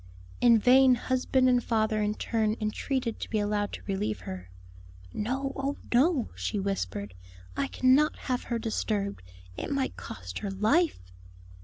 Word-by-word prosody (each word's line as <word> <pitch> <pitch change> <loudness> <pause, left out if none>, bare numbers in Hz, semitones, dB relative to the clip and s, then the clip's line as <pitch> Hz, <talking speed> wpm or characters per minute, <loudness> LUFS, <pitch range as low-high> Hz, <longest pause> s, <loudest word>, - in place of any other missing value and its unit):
In 235 -2 +7
vain 255 +3 +6
husband 255 +1 +1
and 245 -1 +3
father 220 -1 +1
in 210 0 0
turn 220 -2 0
entreated 230 +2 -2
to - - -5
be 220 - 0
allowed 205 0 0
to - - -7
relieve 110 - -2
her. 90 0 -7 0.6
"No, 265 +5 -2
oh 275 +1 -2 0.2
no!" 270 +1 +3
she 210 - -3
whispered. 100 - -3 0.4
"I 280 - 0
cannot 270 +4 +3
have 250 -2 -3
her 235 - -1
disturbed; 210 - -2 0.4
it - - -4
might 275 -2 -1
cost 90 -1 -7
her 200 - -4
life." 210 - +1
225 Hz, 150 wpm, -28 LUFS, 200-260 Hz, 0.6 s, In